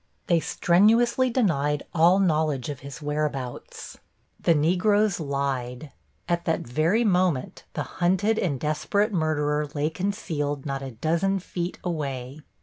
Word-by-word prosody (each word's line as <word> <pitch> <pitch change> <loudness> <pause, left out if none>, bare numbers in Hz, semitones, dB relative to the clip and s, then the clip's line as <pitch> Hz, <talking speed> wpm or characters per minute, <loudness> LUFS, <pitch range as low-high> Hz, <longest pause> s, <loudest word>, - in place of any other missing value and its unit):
They 170 -2 +3
strenuously 230 +11 +3
denied 150 - +1
all 170 +3 +5
knowledge 155 -8 +1
of 145 -3 -5
his 140 +1 -9
whereabouts. 145 -4 -4 0.4
The 170 - +3
Negroes 185 +5 +2
lied. 140 -2 -3 0.4
At 170 -1 -1
that 165 - 0
very 160 - +1
moment 180 - 0
the - - -2 0.2
hunted 195 +5 +2
and 145 -8 -1
desperate 200 - 0
murderer 150 -3 0
lay 150 +2 0
concealed 160 -6 -3
not 135 -1 -3
a 135 - -5
dozen 165 - 0
feet 180 -1 -4
away. 140 -5 -4
155 Hz, 130 wpm, -25 LUFS, 145-185 Hz, 0.4 s, all